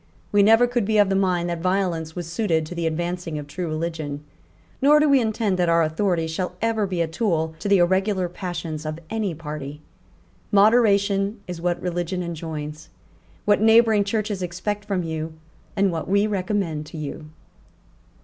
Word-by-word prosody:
We 205 - +5
never 225 +4 +6
could 245 -1 0
be 215 +2 +1
of 205 -2 +5
the 195 - +1
mind 180 -3 +1
that 170 -1 -4
violence 180 -4 -1
was 175 -1 -4
suited 170 -2 0
to 155 - -7
the 170 -1 -1
advancing 170 0 -3
of 150 - -5
true 170 +5 -5
religion; 155 -2 -4 0.6
nor 295 +3 +6
do 300 - +4
we 275 -2 +5
intend 220 -4 0
that 175 -1 +2
our 165 0 +4
authority 165 +1 0
shall 180 +3 -3
ever 220 -2 0
be 180 -2 -1
a 165 - +1
tool 160 -3 -1
to 205 - -3
the 200 - +6
irregular 190 +1 +2
passions 175 -3 -5
of 155 0 -4
any 215 -6 -1
party. 150 -2 -7 0.7
Moderation 200 -1 +3
is 175 -2 -6
what 175 0 0
religion 175 +1 -2
enjoins, 155 -2 -6 0.6
what 205 -1 +3
neighbouring 220 -1 +5
Churches 205 -1 -2
expect 205 +4 -3
from 195 -4 -1
you, 160 -1 -4 0.4
and 195 -2 +2
what 165 +1 -4
we 200 +1 +3
recommend 185 -6 -2
to 160 - -9
you." 150 +1 -6
180 Hz, 175 wpm, -23 LUFS, 160-205 Hz, 0.7 s, never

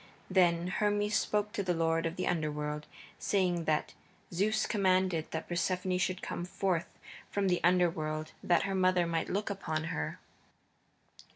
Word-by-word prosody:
Then 175 -2 +4
Hermes 205 +1 +1
spoke 210 0 +1
to 205 - -2
the 180 -3 0
lord 165 0 +1
of 165 - -5
the 180 - -2
Underworld, 150 -3 -2 0.3
saying 180 -4 +1
that 155 -1 0 0.4
Zeus 215 +5 +2
commanded 185 -5 +2
that 160 - -4
Persephone 180 +1 0
should 185 +1 -1
come - - -3
forth 180 -1 -2 0.3
from 200 -1 0
the 180 - +1
Underworld 160 -3 +1
that 175 -1 +3
her 195 - -1
mother 185 -2 +3
might 165 -1 -1
look 205 +2 -1
upon 160 -5 -2
her. 75 0 -3
180 Hz, 150 wpm, -32 LUFS, 165-190 Hz, 0.4 s, Then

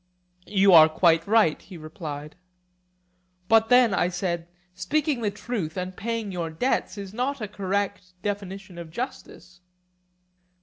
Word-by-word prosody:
You 195 -1 +4
are 160 -1 +9
quite 165 +1 +3
right, 210 -7 +3
he 185 - -12
replied. 155 -2 -8 1.1
But 225 0 +4
then, 245 -4 +5
I 175 - +2
said, 175 -2 -3 0.3
speaking 270 - -1
the 215 - +1
truth 200 -5 -5
and 185 0 -4
paying 225 -1 -3
your 170 -3 -3
debts 215 +8 -1
is 200 -1 -7
not 260 +4 -2
a 215 - -4
correct 200 -1 -3
definition 195 -2 -5
of 170 -2 -8
justice. 180 -3 -7
195 Hz, 135 wpm, -25 LUFS, 175-220 Hz, 1.1 s, are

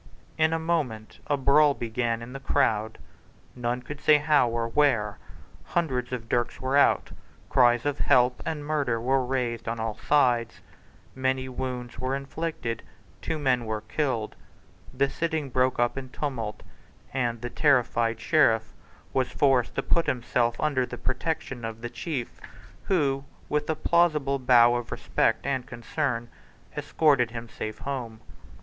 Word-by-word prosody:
In 160 0 +3
a 165 - +1
moment 150 -10 -2
a 145 - +1
brawl 140 +2 +4
began 115 0 -2
in 120 +2 -9
the 135 - -6
crowd, 110 -6 +1 0.6
none 125 0 -2
could 150 +2 -8
say 150 - +6
how 145 -4 +3
or 115 0 -1
where. 115 -6 +1 0.4
Hundreds 130 -8 -1
of 120 -3 -4
dirks 120 +1 -1
were 130 +1 -1
out: 145 - +4 0.4
cries 120 -1 +4
of 145 -1 -1
"Help" 125 -2 +3
and 155 -2 -4
"Murder" 145 -6 0
were 130 +3 +1
raised 125 -3 -2
on 115 0 -2
all 110 -1 -2
sides: 120 -4 +1 0.5
many 130 0 -1
wounds 125 -2 -5
were 130 +2 -1
inflicted: 140 -4 -4 0.4
two 160 - -2
men 130 -5 +1
were 110 -1 -3
killed: 115 -1 -2 0.6
the 135 +2 +1
sitting 160 -2 -2
broke 130 +1 +2
up 120 +2 +1
in 130 -1 -9
tumult; 120 -7 -4 0.5
and 120 -3 -1
the 120 0 -5
terrified 120 -6 +2
Sheriff 115 -9 +3 0.4
was 130 -2 +1
forced 130 -4 +2
to - - -1
put 170 - +1
himself 120 -1 0
under 145 -4 +1
the 125 0 -6
protection 130 -1 -3
of 115 0 -5
the 120 0 -5
chief, 150 -9 -5 0.4
who, 140 -7 +1 0.3
with 150 +1 -1
a 160 - +1
plausible 155 -4 +2
bow 120 -2 +6
of 120 - -6
respect - - 0
and 130 -3 -1
concern, 120 0 -2 0.5
escorted 140 -7 +2
him 115 0 -7
safe 110 -1 -6
home. 120 -5 -5
130 Hz, 150 wpm, -27 LUFS, 120-145 Hz, 0.6 s, say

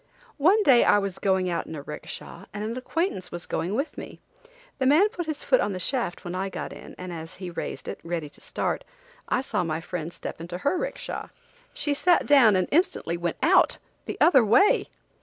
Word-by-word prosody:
One 385 +9 +5
day 260 -7 +6
I - - +5
was 200 -2 -2
going 190 -2 +2
out 170 -1 -2
in 160 - -6
a 145 - -7
'ricksha 150 - -8
and 210 0 -5
an 225 +2 -3
acquaintance 260 - -2
was 175 0 -6
going 180 +5 -2
with 275 +6 -2
me. - - -9 0.6
The 260 - +2
man 325 +10 +5
put 350 -7 -5
his 310 -2 -4
foot - - +3
on 200 - -1
the 185 - -4
shaft 235 -5 -1
when 175 - -4
I 190 +1 -2
got - - -6
in, - - -11
and 180 -1 -6
as 160 -1 -8
he 180 -2 -7
raised - - -5
it, - - -5
ready 165 -2 -3
to 145 - -16
start, - - -2 0.5
I - - +2
saw 265 - -1
my 160 -1 -2
friend 170 -1 -5
step 165 - -7
into 175 +1 -5
her 285 - 0
'ricksha. - - -4 0.5
She 290 - 0
sat 345 +4 +3
down 255 -8 +6
and 185 -1 +1
instantly 295 - +1
went 170 0 -2
out–the - - +1
other 270 -8 +6
way! 235 - +4
200 Hz, 210 wpm, -26 LUFS, 175-285 Hz, 0.6 s, day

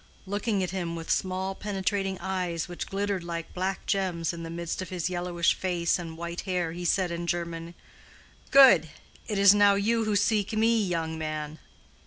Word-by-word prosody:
Looking 205 0 -1
at 180 - -3
him 175 -3 -3
with 165 -1 -4
small 190 +1 -1
penetrating 195 -1 -2
eyes 180 -3 -2
which 175 -1 -6
glittered 195 -2 -2
like 170 -1 -5
black 190 +1 -2
gems 180 -5 -1
in 170 - -7
the 165 - -6
midst 170 +2 -4
of 185 - -6
his 180 -1 -2
yellowish 175 -1 +1
face 175 -2 0
and 165 -2 -7
white 170 +1 -5
hair, 180 -4 -1
he 175 +1 -6
said 180 +1 +1
in 170 0 -4
German, 170 -1 -3 0.7
"Good! 255 - +7 0.4
It 210 - -2
is 200 0 +8
now 205 -1 +5
you 225 +3 +1
who 215 -1 0
seek 205 0 +1
me, 225 0 +3
young 165 -3 -2
man." 155 0 -4
180 Hz, 180 wpm, -27 LUFS, 170-200 Hz, 0.7 s, is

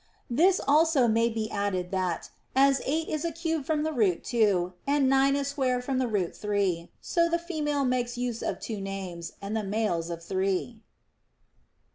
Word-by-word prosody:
This 355 +9 +4
also 300 -3 +4
may 230 +1 +3
be 220 -1 -3
added 195 -3 -1
that, 185 -3 -2 0.2
as 275 0 +4
eight 315 +4 0
is 310 0 -2
a 335 - -1
cube 325 -2 -2
from 305 0 0
the 315 0 -1
root 205 - +1
two, 200 -7 +2
and 280 -1 +3
nine 270 +1 +4
a 280 0 0
square 265 -3 0
from 255 +1 -2
the 255 - +1
root 200 -6 -1
three, 200 -5 -1
so 335 -1 +1
the 340 - +2
female 300 -5 -1
makes 245 -1 -1
use 245 -2 -2
of - - -2
two 215 -3 -5
names, 190 -4 -5
and 200 +2 -3
the 220 - 0
males 200 -5 -1
of 170 -1 -6
three. 195 +5 -1
240 Hz, 180 wpm, -28 LUFS, 195-285 Hz, 0.2 s, This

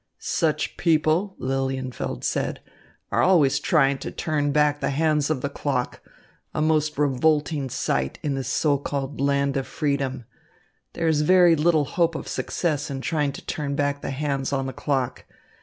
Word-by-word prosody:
"Such 155 -3 -1
people," 165 +4 +2
Lilienfeld 130 -1 -3
said, - - -1 0.5
"are - - +2
always 145 -7 +4
trying 140 -4 +2
to - - -5
turn 145 -2 -1
back 150 0 +2
the - - -1
hands 150 0 +1
on 150 -5 -1
the 140 - -1
clock, 140 -3 -2 0.5
a - - 0
most 155 -1 +1
revolting 145 0 +1
sight 65 - -1
in 145 - 0
this 135 -2 -3
so 145 +1 +1
called 140 -1 -4
land 140 0 +1
of 135 - -2
freedom. 135 -4 -2 0.7
There 165 - -1
is 155 -2 +3
very 175 +1 +6
little 155 -1 +3
hope 165 +3 0
of - - -5
success 150 -5 -2
in 135 -1 -4
trying 150 -1 0
to - - -10
turn 140 -2 -3
back 145 0 -1
the - - -4
hands 140 -1 -2
on 135 -1 0
the 130 - -4
clock. 135 -3 -2
145 Hz, 165 wpm, -24 LUFS, 135-155 Hz, 0.7 s, very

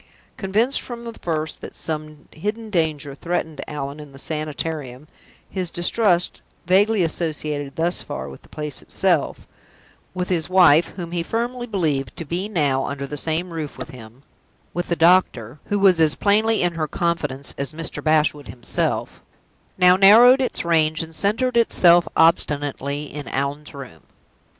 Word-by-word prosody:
Convinced 220 +7 +1
from 235 -1 -7
the 230 - -6
first 160 -6 -4
that - - -9
some 155 -1 -6
hidden 215 +6 -5
danger 155 -5 -1
threatened 160 -1 -3
Allan 145 0 -5
in 150 -2 -11
the - - -12
Sanitarium, 150 -2 -4 0.4
his 185 -3 -4
distrust 175 +1 +1 0.2
vaguely 195 +3 +3
associated, 150 -4 -2
thus 170 +2 +1
far, 145 - -6
with - - -11
the - - -21
place 150 -2 -6
itself; 180 -6 0 0.7
with 180 0 -3
his 175 -2 0
wife 175 -4 +6
(whom 175 -3 -6
he 175 -1 -1
firmly 240 +6 -3
believed 155 - -1
to 165 - -5
be 180 +7 -3
now 145 -9 +1
under 140 0 -4
the 150 - -6
same 160 +4 -2
roof 155 -3 -6
with - - -7
him); 120 +1 -13 0.5
with 175 0 -3
the 170 - 0
doctor, 165 -8 +2
who 205 - -1
was 190 -4 +4
as 155 -1 +4
plainly 215 +1 +2
in 175 -1 +1
her 160 -2 -2
confidence 150 -5 -2
as 140 - -3
Mr. 165 +1 -3
Bashwood 155 -2 +1
himself 120 -1 -3 0.6
now 180 0 +6
narrowed 230 +7 +7
its 255 - -2
range, 160 -2 +2
and 165 0 -11
centered 230 +7 0
itself 175 -7 +4
obstinately 145 -3 +1
in 150 -1 -8
Allan's 140 +2 -3
room. 125 - -10
165 Hz, 155 wpm, -22 LUFS, 145-185 Hz, 0.7 s, narrowed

